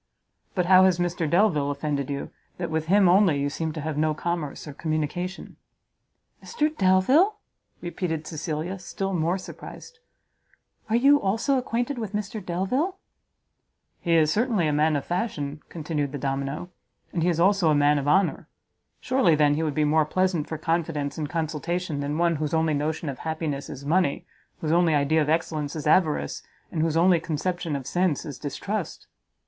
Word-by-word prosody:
"But 180 Hz, -2 st, +1 dB
how 185 Hz, +1 st, +7 dB
has 185 Hz, -2 st, +3 dB
Mr 175 Hz, -3 st, -1 dB
Delvile 170 Hz, -6 st, +3 dB
offended 145 Hz, -1 st, -2 dB
you, 140 Hz, -1 st, -4 dB, 0.3 s
that 175 Hz, -2 st, -4 dB
with 160 Hz, 0 st, -1 dB
him 195 Hz, +1 st, +5 dB
only 180 Hz, -5 st, +4 dB
you 140 Hz, 0 st, -1 dB
seem 160 Hz, +1 st, -3 dB
to 155 Hz, -, -5 dB
have 150 Hz, 0 st, -3 dB
no 155 Hz, 0 st, +1 dB
commerce 165 Hz, -3 st, -4 dB
or 145 Hz, -, -7 dB
communication?" 160 Hz, +5 st, -3 dB, 0.9 s
"Mr 310 Hz, -9 st, -1 dB
Delvile!" 255 Hz, -, +4 dB, 0.4 s
repeated 175 Hz, -3 st, -3 dB
Cecilia, 160 Hz, +4 st, -4 dB
still 195 Hz, +2 st, -4 dB
more 170 Hz, +1 st, +1 dB
surprised, 460 Hz, -, -10 dB, 0.9 s
"are 220 Hz, -, +2 dB
you 280 Hz, +4 st, +5 dB
also 225 Hz, +8 st, +1 dB
acquainted 245 Hz, +1 st, -1 dB
with 215 Hz, -3 st, -5 dB
Mr 210 Hz, 0 st, -4 dB
Delvile?" 225 Hz, -, -1 dB, 1.0 s
"He 170 Hz, -2 st, +1 dB
is 155 Hz, -2 st, +4 dB
certainly 215 Hz, -3 st, +1 dB
a 150 Hz, -, +1 dB
man 155 Hz, +1 st, +2 dB
of 140 Hz, -, -2 dB
fashion," 155 Hz, -6 st, -3 dB
continued 150 Hz, -4 st, -3 dB
the -, -, -3 dB
domino, 140 Hz, +5 st, -3 dB, 0.4 s
"and 170 Hz, -, -1 dB
he 175 Hz, -, +2 dB
is 170 Hz, -2 st, 0 dB
also 190 Hz, -1 st, +4 dB
a 150 Hz, -, +4 dB
man 145 Hz, 0 st, +4 dB
of 140 Hz, -, -4 dB
honour; 190 Hz, +5 st, +2 dB, 0.5 s
surely, 250 Hz, -11 st, +3 dB
then, 145 Hz, -1 st, +4 dB
he 150 Hz, -, -1 dB
would 155 Hz, -3 st, -1 dB
be 155 Hz, -, +2 dB
more 155 Hz, +1 st, +3 dB
pleasant 185 Hz, -2 st, 0 dB
for 160 Hz, -, -4 dB
confidence 160 Hz, -3 st, -2 dB
and 150 Hz, -2 st, -3 dB
consultation 165 Hz, 0 st, -2 dB
than 145 Hz, +1 st, -2 dB
one 170 Hz, -1 st, +2 dB
whose 155 Hz, +2 st, -1 dB
only 160 Hz, -1 st, +2 dB
notion 155 Hz, +2 st, -2 dB
of 135 Hz, -2 st, -4 dB
happiness 155 Hz, -3 st, -3 dB
is 140 Hz, -, -8 dB
money, 165 Hz, -1 st, +1 dB, 0.4 s
whose 155 Hz, -, -1 dB
only 170 Hz, -2 st, +4 dB
idea 145 Hz, +2 st, +2 dB
of 150 Hz, -, 0 dB
excellence 155 Hz, -2 st, -1 dB
is 155 Hz, -, -5 dB
avarice, 155 Hz, -, +2 dB, 0.3 s
and 160 Hz, -, -1 dB
whose 160 Hz, 0 st, +1 dB
only 175 Hz, 0 st, +5 dB
conception 165 Hz, 0 st, -2 dB
of 135 Hz, -2 st, -5 dB
sense 175 Hz, +1 st, 0 dB
is 145 Hz, -4 st, -7 dB
distrust!" 170 Hz, +7 st, -4 dB
165 Hz, 175 wpm, -25 LUFS, 150-185 Hz, 1.0 s, how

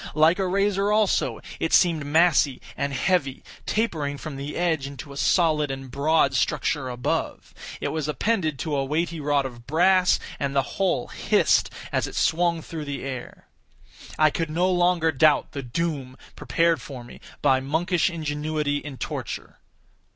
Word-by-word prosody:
Like 160 Hz, +4 st, +4 dB
a 190 Hz, -, +1 dB
razor 200 Hz, +1 st, +1 dB
also, 210 Hz, -2 st, +1 dB, 0.2 s
it 165 Hz, -, -1 dB
seemed 165 Hz, -6 st, +3 dB
massy 155 Hz, -3 st, +3 dB, 0.2 s
and 140 Hz, 0 st, -2 dB
heavy, 140 Hz, -2 st, 0 dB, 0.2 s
tapering 155 Hz, -10 st, -1 dB
from 145 Hz, +1 st, -7 dB
the 140 Hz, +2 st, -6 dB
edge 160 Hz, -6 st, 0 dB
into 140 Hz, 0 st, -9 dB
a -, -, -11 dB
solid 155 Hz, -1 st, +2 dB
and 135 Hz, -1 st, -6 dB
broad 140 Hz, 0 st, +2 dB
structure 130 Hz, +1 st, 0 dB
above. 125 Hz, 0 st, -3 dB, 0.3 s
It -, -, -2 dB
was 155 Hz, -2 st, -2 dB
appended 155 Hz, -, 0 dB
to 155 Hz, -3 st, -2 dB
a 135 Hz, -, +1 dB
weighty 165 Hz, +4 st, -1 dB
rod 145 Hz, -1 st, +1 dB
of 120 Hz, -2 st, -9 dB
brass, 180 Hz, +4 st, +4 dB, 0.2 s
and 140 Hz, 0 st, -2 dB
the 135 Hz, -, +3 dB, 0.2 s
whole 180 Hz, -10 st, +1 dB
hissed -, -, +2 dB, 0.2 s
as -, -, 0 dB
it -, -, -9 dB
swung 170 Hz, 0 st, +1 dB
through 160 Hz, -2 st, -6 dB
the 140 Hz, -1 st, -5 dB
air. 130 Hz, -3 st, -7 dB, 0.7 s
I 155 Hz, -1 st, +4 dB
could 165 Hz, 0 st, -2 dB
no 175 Hz, +4 st, +1 dB
longer 175 Hz, -2 st, +2 dB
doubt 150 Hz, +1 st, +3 dB
the 140 Hz, -, -5 dB
doom 135 Hz, 0 st, -3 dB, 0.2 s
prepared 165 Hz, -1 st, +1 dB
for 130 Hz, -4 st, -8 dB
me 120 Hz, -, -13 dB, 0.2 s
by 130 Hz, 0 st, +4 dB
monkish 165 Hz, +7 st, +1 dB
ingenuity 150 Hz, -2 st, -2 dB
in 145 Hz, -2 st, -7 dB
torture. -, -, -6 dB
155 Hz, 160 wpm, -24 LUFS, 140-170 Hz, 0.7 s, Like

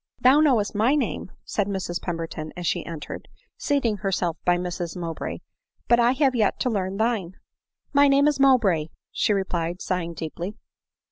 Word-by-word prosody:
" -, -, -41 dB
Thou 260 Hz, +4 st, +7 dB
knowest 250 Hz, -10 st, +3 dB
my 225 Hz, +7 st, +3 dB
name," 260 Hz, -9 st, -2 dB, 0.2 s
said 205 Hz, -2 st, -1 dB
Mrs 190 Hz, -3 st, -3 dB
Pemberton 165 Hz, -3 st, -4 dB
as 175 Hz, -, -5 dB
she -, -, 0 dB
entered, 165 Hz, -3 st, -7 dB, 0.3 s
seating 255 Hz, -7 st, +1 dB
herself 185 Hz, -4 st, -1 dB
by 175 Hz, 0 st, +3 dB
Mrs 175 Hz, -1 st, -4 dB
Mowbray, 165 Hz, -2 st, -5 dB, 0.2 s
" -, -, -47 dB
but 235 Hz, -, +5 dB
I 240 Hz, +1 st, +4 dB
have 270 Hz, -1 st, +2 dB
yet 220 Hz, -5 st, +1 dB
to 250 Hz, -, +1 dB
learn 195 Hz, -2 st, -2 dB
thine." 215 Hz, -5 st, -1 dB, 0.3 s
" -, -, -49 dB
My 285 Hz, 0 st, +6 dB
name 280 Hz, +1 st, +4 dB
is 295 Hz, -2 st, +1 dB
Mowbray," 220 Hz, -, +4 dB, 0.2 s
she -, -, +1 dB
replied, 180 Hz, -3 st, -1 dB
sighing 170 Hz, -3 st, -3 dB
deeply. 170 Hz, +5 st, -5 dB
195 Hz, 180 wpm, -24 LUFS, 175-250 Hz, 0.3 s, Thou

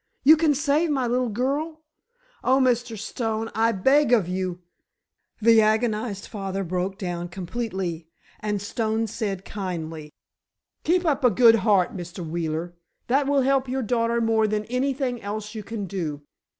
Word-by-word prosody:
You 310 Hz, +4 st, +8 dB
can 315 Hz, -2 st, +2 dB
save 300 Hz, +3 st, +1 dB
my 270 Hz, -4 st, +1 dB
little 245 Hz, +1 st, 0 dB
girl? 290 Hz, +8 st, -2 dB, 0.6 s
Oh, 260 Hz, +1 st, +4 dB
Mr. 245 Hz, -3 st, +1 dB
Stone, 225 Hz, +1 st, -3 dB
I 225 Hz, +1 st, +2 dB
beg 265 Hz, +7 st, +3 dB
of 220 Hz, -8 st, +4 dB
you——" 180 Hz, -1 st, -3 dB, 0.8 s
The 225 Hz, 0 st, +6 dB
agonized 215 Hz, -1 st, 0 dB
father 195 Hz, -2 st, -4 dB
broke 185 Hz, +2 st, -2 dB
down 175 Hz, -3 st, -4 dB
completely, 185 Hz, -3 st, -4 dB, 0.3 s
and 210 Hz, -1 st, -2 dB
Stone 220 Hz, +1 st, -1 dB
said, 200 Hz, -4 st, -3 dB
kindly: 165 Hz, -6 st, -5 dB, 0.7 s
"Keep 350 Hz, +2 st, +2 dB
up 290 Hz, -4 st, +1 dB
a 250 Hz, -, +7 dB
good 230 Hz, +2 st, +6 dB
heart, 200 Hz, -4 st, +2 dB
Mr. 175 Hz, -1 st, -6 dB
Wheeler. 165 Hz, +1 st, -3 dB, 0.4 s
That 275 Hz, +2 st, +2 dB
will 280 Hz, -1 st, +3 dB
help 270 Hz, 0 st, +2 dB
your 260 Hz, 0 st, -1 dB
daughter 230 Hz, +1 st, +1 dB
more 225 Hz, -1 st, +2 dB
than 210 Hz, 0 st, -1 dB
anything 250 Hz, 0 st, -1 dB
else 210 Hz, +1 st, -5 dB
you 220 Hz, -, -5 dB
can 210 Hz, -1 st, -5 dB
do. 160 Hz, -7 st, -4 dB
220 Hz, 150 wpm, -24 LUFS, 190-250 Hz, 0.8 s, You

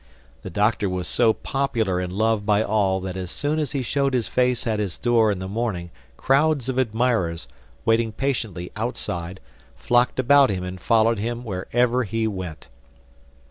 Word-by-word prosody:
The -, -, -7 dB
Doctor 105 Hz, +2 st, +1 dB
was 90 Hz, -1 st, -3 dB
so 115 Hz, -2 st, +3 dB
popular 115 Hz, -8 st, -1 dB
and 90 Hz, 0 st, -3 dB
loved 110 Hz, +2 st, +1 dB
by 105 Hz, +1 st, +2 dB
all 100 Hz, -3 st, +1 dB
that 95 Hz, -1 st, -5 dB
as 90 Hz, -1 st, -5 dB
soon 150 Hz, -, -1 dB
as 150 Hz, -5 st, -2 dB
he 135 Hz, -2 st, -1 dB
showed 140 Hz, +2 st, 0 dB
his 120 Hz, -3 st, 0 dB
face 125 Hz, -1 st, +1 dB
at 110 Hz, -2 st, 0 dB
his 100 Hz, -5 st, -3 dB
door 115 Hz, -3 st, +3 dB
in 100 Hz, -, -2 dB
the 95 Hz, +1 st, -5 dB
morning 100 Hz, -5 st, -3 dB, 0.3 s
crowds 140 Hz, -1 st, +2 dB
of 130 Hz, 0 st, 0 dB
admirers, 110 Hz, -, 0 dB, 0.4 s
waiting 115 Hz, 0 st, +2 dB
patiently 110 Hz, -8 st, -3 dB
outside, 95 Hz, -6 st, -4 dB, 0.4 s
flocked 120 Hz, +1 st, +1 dB
about 140 Hz, +1 st, +5 dB
him 95 Hz, -3 st, -2 dB
and 90 Hz, 0 st, -6 dB
followed 115 Hz, 0 st, +3 dB
him 120 Hz, +3 st, -3 dB
wherever 120 Hz, +5 st, 0 dB
he 110 Hz, +1 st, -1 dB
went. 95 Hz, -6 st, -6 dB
110 Hz, 170 wpm, -23 LUFS, 95-125 Hz, 0.4 s, about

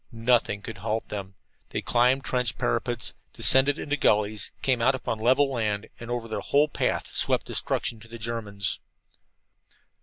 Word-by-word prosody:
Nothing 115 Hz, -3 st, +1 dB
could 115 Hz, -4 st, -7 dB
halt 110 Hz, +2 st, -2 dB
them. 100 Hz, -2 st, -6 dB, 0.3 s
They -, -, -3 dB
climbed 125 Hz, +3 st, +3 dB
trench 125 Hz, -3 st, 0 dB
parapets, -, -, -1 dB, 0.2 s
descended 135 Hz, +2 st, +5 dB
into 145 Hz, -, -2 dB
gullies, 105 Hz, -3 st, +1 dB
came 130 Hz, -3 st, +2 dB
out 130 Hz, +3 st, +4 dB
upon 115 Hz, -3 st, -3 dB
level 130 Hz, +5 st, +3 dB
land, 110 Hz, -4 st, -2 dB
and 115 Hz, -, -8 dB
over 120 Hz, -1 st, -3 dB
their 110 Hz, -, -3 dB
whole 145 Hz, +2 st, +3 dB
path -, -, -1 dB
swept -, -, +1 dB
destruction 115 Hz, -, -2 dB
to 115 Hz, -, -13 dB
the 115 Hz, +1 st, -9 dB
Germans. 110 Hz, -4 st, -3 dB
115 Hz, 155 wpm, -26 LUFS, 105-125 Hz, 0.3 s, descended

